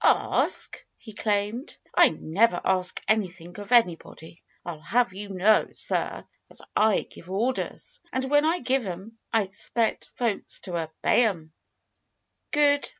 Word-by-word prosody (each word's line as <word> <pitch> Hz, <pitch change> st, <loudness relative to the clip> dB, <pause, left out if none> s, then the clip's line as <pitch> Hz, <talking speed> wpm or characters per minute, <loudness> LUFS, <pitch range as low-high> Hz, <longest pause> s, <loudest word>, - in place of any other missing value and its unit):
"Ask!" -, -, +2 dB
he 220 Hz, -, -12 dB
exclaimed. 210 Hz, +5 st, -2 dB, 0.2 s
"I -, -, +7 dB
never 180 Hz, +3 st, +1 dB
ask 185 Hz, -1 st, +1 dB
anything 185 Hz, -4 st, -1 dB
of 205 Hz, +2 st, -9 dB
anybody. 170 Hz, -7 st, +1 dB, 0.2 s
I'll 170 Hz, -3 st, -6 dB
have 225 Hz, +6 st, +1 dB
you 200 Hz, +1 st, -7 dB
know, 195 Hz, +3 st, +3 dB
sir, -, -, -1 dB, 0.2 s
that -, -, -13 dB
I 215 Hz, -1 st, +4 dB
give 175 Hz, -, -14 dB
orders. 250 Hz, -, -2 dB
And 260 Hz, 0 st, -1 dB
when 290 Hz, +1 st, +4 dB
I 330 Hz, +3 st, +1 dB
give 255 Hz, -3 st, 0 dB
'em 195 Hz, +6 st, -8 dB
I 225 Hz, -2 st, +3 dB
expect 220 Hz, +4 st, -1 dB
folks 230 Hz, -5 st, -1 dB
to 185 Hz, -, -8 dB
obey 165 Hz, +8 st, +1 dB
'em." 165 Hz, -7 st, -3 dB, 1.0 s
"Good!" 290 Hz, -1 st, +3 dB
210 Hz, 140 wpm, -26 LUFS, 180-240 Hz, 1.0 s, I